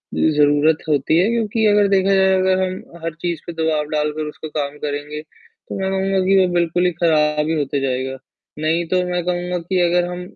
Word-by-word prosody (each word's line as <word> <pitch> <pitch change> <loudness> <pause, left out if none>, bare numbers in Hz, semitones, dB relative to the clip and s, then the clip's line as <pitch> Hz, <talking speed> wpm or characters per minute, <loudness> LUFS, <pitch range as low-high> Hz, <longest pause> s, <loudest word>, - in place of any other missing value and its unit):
ज़रूरत 150 0 +3
होती 150 +2 +2
है, 195 - +3
क्योंकि 225 -1 0
अगर 205 -1 +4
देखा 195 0 +3
जाए 190 0 +4
अगर 185 0 +2
हम 185 -2 -5
हर 165 -1 -3
चीज़ 170 -3 -2
पे 170 - -5
दबाव 160 -2 0
डालकर 150 0 -1
उसपे 155 +1 -9
काम 145 -1 -4
करेंगे, 145 +1 -4
तो 155 +4 -12
मैं 190 0 -1
कहूँगा 195 0 0
कि 195 +1 +4
वो 185 - +4
बिल्कुल 175 +1 +1
ही 180 - +2
खराब 150 -2 +1
ही 160 - 0
होते 140 0 -1
जाएगा, 130 0 -2 0.4
नहीं 165 +2 0
तो 185 -1 +1
मैं 180 -1 -1
कहूँगा 180 0 -2
कि 180 +2 -2
अगर 175 +1 +2
हम 180 0 -6
170 Hz, 205 wpm, -20 LUFS, 150-185 Hz, 0.4 s, अगर